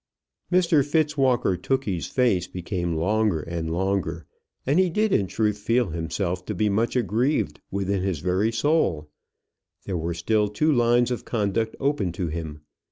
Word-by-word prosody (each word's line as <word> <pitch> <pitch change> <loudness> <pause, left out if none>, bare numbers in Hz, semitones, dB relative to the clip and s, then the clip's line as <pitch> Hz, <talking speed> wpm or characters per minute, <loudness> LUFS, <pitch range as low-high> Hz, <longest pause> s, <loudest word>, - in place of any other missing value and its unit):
Mr 170 -5 +4
Fitzwalker 145 - +2
Tookey's 100 -2 -2
face 115 -9 +1
became 90 -2 -3
longer 100 0 +1
and 80 0 -4
longer, 95 -2 -1 0.4
and 145 +7 +3
he 185 -1 +3
did 210 +4 +1
in 100 - +2
truth 105 +1 0
feel 115 +1 +1
himself 85 +3 -2
to - - -3
be 105 -1 +1
much 110 +5 0
aggrieved 125 - 0
within 100 0 -1
his 95 -3 -1
very 95 +8 0
soul. 115 - 0 0.7
There 95 - -2
were 85 +1 -3
still 105 +5 +1
two 130 +10 +1
lines 120 0 +3
of 120 - -3
conduct 110 0 -1
open 135 -10 0
to 85 -1 -3
him. 80 -2 -6
105 Hz, 155 wpm, -24 LUFS, 90-125 Hz, 0.7 s, Mr